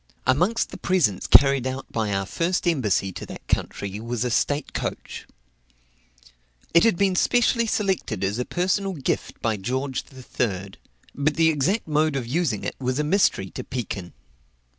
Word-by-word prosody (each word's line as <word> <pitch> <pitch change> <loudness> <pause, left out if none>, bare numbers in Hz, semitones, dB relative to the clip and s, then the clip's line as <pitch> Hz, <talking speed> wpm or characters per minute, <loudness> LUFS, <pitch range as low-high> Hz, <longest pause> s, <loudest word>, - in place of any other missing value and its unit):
Amongst 180 - +2
the - - -8
presents 155 - +1
carried 135 -2 +6
out 130 +1 -4
by 110 -2 -1
our 95 0 0
first 175 - -1
embassy 105 - +1
to - - -7
that - - -10
country 100 +1 -2
was 120 +1 -3
a 125 - -1
state 145 +5 0
coach. - - -5 1.5
It 170 - +6
had 225 -6 +3
been 195 -1 +2
specially 235 +3 +2
selected 190 - -1
as 100 +4 -1
a 125 - -1
personal 190 +2 0
gift 140 -7 -3
by 110 -2 +1
George 130 +6 -2
III.; 105 -7 -3 0.4
but 145 +2 0
the 165 -1 +4
exact 165 - 0
mode 155 -1 +1
of 130 -3 -2
using 130 - -1
it - - -3
was 130 0 -1
a 150 - +1
mystery 150 - +2
to - - -6
Pekin. 100 -8 -5
135 Hz, 160 wpm, -24 LUFS, 110-175 Hz, 1.5 s, carried